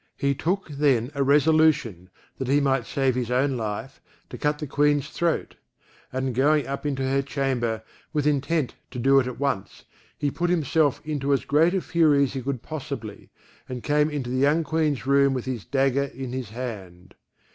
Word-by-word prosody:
He 140 0 +1
took 180 +8 -1
then 140 -4 +1
a 140 - -2
resolution, 145 - +3 0.3
that 130 - -3
he 140 +2 +3
might 135 -3 +1
save 135 -3 +1
his 125 -1 -2
own 130 +2 +1
life, 110 +3 -5 0.3
to - - -6
cut 150 -1 0
the 150 - -5
Queen's 145 +1 +1
throat; 170 -1 -1 0.6
and 130 0 -2
going 145 +3 +3
up 140 +3 -4
into 135 -2 -2
her 135 +1 +1
chamber, 130 -5 -2 0.3
with 150 -2 -1
intent 150 0 +1 0.2
to 125 - -8
do 135 +3 +4
it 125 - 0
at 125 - -6
once, 130 -9 -3 0.3
he 145 - -1
put 175 +4 -1
himself 160 -4 +1
into 145 -2 0
as 135 - 0
great 160 +6 +3
a 190 - +1
fury 155 -5 +3
as 135 - -1
he 135 - -3
could 130 -1 -4
possibly, 140 -8 -7 0.4
and 125 -2 -5
came 150 +1 +2
into 140 -5 -4
the 130 - -1
young 145 +5 +3
Queen's 155 -3 0
room 140 0 +4
with 125 - -3
his 125 -5 -4
dagger 135 0 +1
in 130 -2 -7
his 130 -4 -4
hand. 100 -7 -7
140 Hz, 190 wpm, -25 LUFS, 125-150 Hz, 0.6 s, do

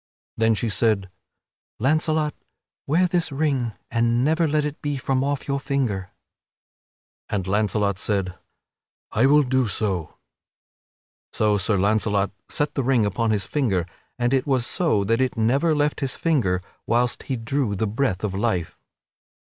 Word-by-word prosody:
Then 115 0 +3
she 110 +3 -1
said: 105 -3 +1 0.7
"Launcelot, 155 +3 +1 0.5
wear 170 +6 +3
this 175 -2 0
ring 135 -5 0 0.2
and 120 +1 +2
never 160 +2 +2
let 150 0 +1
it 150 0 -5
be 145 -1 -2
from 130 0 0
off 140 0 -2
your 140 0 0
finger." 130 -9 -1 1.2
And 100 -3 -1
Launcelot 100 0 0
said: 95 -4 -1 0.8
"I 120 +5 +3
will 150 +1 +5
do 130 -1 +1
so." 95 -5 -2 1.2
So 105 -1 +2
Sir 100 +2 +1
Launcelot 100 0 +1 0.2
set 145 0 -1
the 135 - 0
ring 125 -4 +3
upon 105 +3 0
his 105 -3 +1
finger 100 - 0 0.3
and 120 +1 +1
it 135 +2 +1
was 130 -4 +2
so 155 - +1
that 115 +5 +1
it 130 -2 0
never 135 +8 +2
left 150 0 +1
his 135 -2 -2
finger 100 - +1 0.2
whilst 120 +1 +1
he 130 - +1
drew 115 -1 -1
the 110 - 0
breath 110 -3 -1
of 105 -3 -1
life. 95 -5 -1
120 Hz, 150 wpm, -23 LUFS, 105-140 Hz, 1.2 s, will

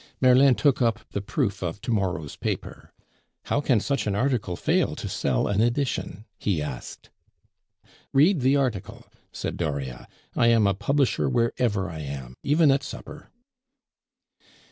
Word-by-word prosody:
Merlin 130 +1 +6
took 140 -1 +2
up 115 -2 +1
the 100 - -2
proof 105 +1 -2
of 90 +1 -3
to 120 - -3
morrow's 95 -8 -1
paper. - - -5 0.5
"How 145 - 0
can 130 -6 +3
such 140 +2 -1
an 100 - 0
article 120 -6 0
fail - - +1
to - - -5
sell - - 0
an 100 +1 +1
edition?" 120 -4 -1
he 95 -6 0
asked. 75 -4 -7 1.0
"Read 155 +6 +4
the 130 +3 +3
article," 125 -8 -2 0.3
said - - -4
Dauriat. 70 -6 -4 0.3
"I 120 - +3
am 115 -2 +4
a 100 - +3
publisher 130 +5 +1
wherever 115 -5 0
I 80 -3 -7
am, 70 -4 -6
even 150 +1 +4
at 135 +1 +2
supper." 150 - -9
115 Hz, 145 wpm, -25 LUFS, 95-135 Hz, 1.0 s, Merlin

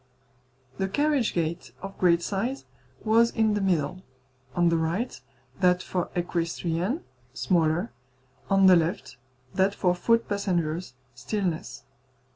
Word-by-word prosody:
The 190 - +1
carriage 285 +1 +1
gate, 170 -1 -3
of 195 0 -6
great 170 -2 +4
size, 230 +7 -2 0.4
was 230 +2 +4
in 220 -2 +1
the 205 - 0
middle; 180 -2 0 0.5
on 175 -1 +4
the 165 - +2
right, 170 +10 -2 0.4
that 180 -1 +3
for 180 -2 -2
equestrians, 175 - -1 0.3
smaller; 160 -7 +1 0.6
on 195 -1 +5
the 185 -1 +8
left, 170 +1 -1 0.4
that 195 +1 +2
for 180 -1 +2
foot 230 +6 +2
passengers, 175 -7 -1 0.2
still 135 - -3
less. 130 -8 -4
180 Hz, 125 wpm, -26 LUFS, 170-205 Hz, 0.6 s, the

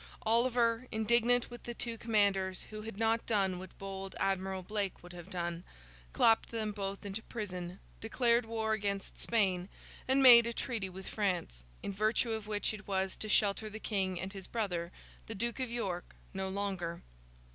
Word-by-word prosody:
Oliver, 235 +1 +3
indignant 235 +3 +3
with 240 - -8
the 240 - -6
two 230 0 -2
commanders 200 -5 +1
who 215 0 -6
had 220 -2 -7
not 225 +1 +1
done 195 -4 +1
what 185 - -10
bold 195 0 -6
Admiral 190 -1 0
Blake 200 -1 -3
would 175 0 -11
have 175 +1 -10
done, 175 -2 -3 0.5
clapped 225 - +4
them 220 -2 -2
both 200 -1 -4
into 200 +2 -4
prison, 185 -6 -6 0.2
declared 235 +1 +2
war 220 -1 0
against 200 -2 -3
Spain, 190 -5 +1 0.4
and 265 +1 +4
made 235 -2 +10
a 235 - -2
treaty 225 -6 -2
with 190 +1 -9
France, 180 - -2 0.2
in 200 - -3
virtue 215 +4 +1
of 220 -1 -3
which 210 0 0
it 210 0 -9
was 190 -1 0
to 215 - -5
shelter 210 +1 +2
the 215 +1 -7
King 190 -5 -1
and 190 +2 -5
his 195 -2 -7
brother 180 -7 -2 0.4
the 225 - -5
Duke 235 +5 -2
of 255 -2 -1
York 195 -7 -3 0.2
no 190 0 -2
longer. 190 -4 -3
205 Hz, 175 wpm, -33 LUFS, 190-225 Hz, 0.5 s, made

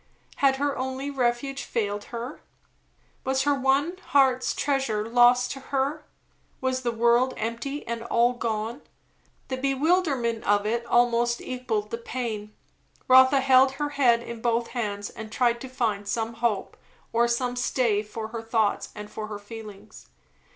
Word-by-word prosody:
Had 275 -1 +4
her 280 +1 -1
only 265 +2 -3
refuge 265 +1 -1
failed 205 -2 -2
her? 240 +4 -7 0.8
Was 265 0 +1
her 290 0 +3
one 280 +6 +1
heart's 260 -1 +3
treasure 265 -7 0
lost 245 +1 +4
to 270 - -5
her? 280 +3 -2 0.5
Was 260 0 -1
the 240 -2 -1
world 235 +3 +3
empty, 235 +6 -4
and 230 0 -4
all 235 +1 +3
gone? 230 +1 -3 0.7
The 260 - -2
bewilderment 275 -4 +1
of 205 0 +2
it 230 +2 0
almost 240 0 +2
equalled 230 -5 -3
the 230 - -3
pain. 225 -4 -4 0.6
Rotha 260 +1 +7
held 265 0 +5
her 290 +1 -2
head 245 -5 +3
in 235 -1 -8
both 235 0 0
hands 205 -4 -3
and 220 0 -9
tried 235 0 +1
to 265 - -7
find 220 -6 -1
some 225 +2 -2
hope, 230 -4 -2 0.4
or 235 +1 +3
some 245 +1 -1
stay 245 -4 +1
for 220 +1 -7
her 230 0 -5
thoughts 225 -2 0
and 210 0 -7
for 215 0 -6
her 210 -1 -6
feelings. 210 -1 -11
240 Hz, 150 wpm, -26 LUFS, 225-265 Hz, 0.8 s, Rotha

